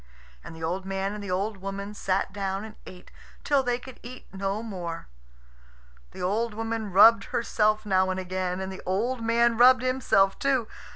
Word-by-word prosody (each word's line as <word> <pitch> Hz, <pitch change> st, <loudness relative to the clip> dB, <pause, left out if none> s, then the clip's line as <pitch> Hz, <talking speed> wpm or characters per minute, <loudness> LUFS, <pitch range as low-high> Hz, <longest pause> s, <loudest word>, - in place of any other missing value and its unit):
And -, -, -10 dB
the 160 Hz, -, -9 dB
old 180 Hz, +4 st, -2 dB
man 195 Hz, +1 st, -3 dB
and 210 Hz, -1 st, -7 dB
the 200 Hz, -, -6 dB
old 195 Hz, +3 st, -1 dB
woman 195 Hz, +1 st, -6 dB
sat 195 Hz, -1 st, -1 dB
down 195 Hz, +1 st, -3 dB
and 215 Hz, -1 st, -11 dB
ate 180 Hz, -1 st, -13 dB, 0.3 s
till 285 Hz, -2 st, +3 dB
they 245 Hz, -2 st, 0 dB
could 255 Hz, 0 st, -12 dB
eat 250 Hz, +1 st, -10 dB
no 195 Hz, +3 st, -3 dB
more. 175 Hz, -6 st, -6 dB, 1.0 s
The -, -, -8 dB
old 210 Hz, +4 st, -1 dB
woman 225 Hz, -2 st, -3 dB
rubbed 225 Hz, +5 st, +7 dB
herself 215 Hz, -2 st, 0 dB
now 190 Hz, -2 st, +2 dB
and 185 Hz, 0 st, -2 dB
again. 185 Hz, 0 st, -3 dB
And 190 Hz, 0 st, -4 dB
the 190 Hz, -, -8 dB
old 230 Hz, +7 st, -1 dB
man 230 Hz, 0 st, +2 dB
rubbed 255 Hz, +1 st, +6 dB
himself 245 Hz, -7 st, +2 dB
too. 265 Hz, -5 st, +1 dB
205 Hz, 180 wpm, -26 LUFS, 190-230 Hz, 1.0 s, rubbed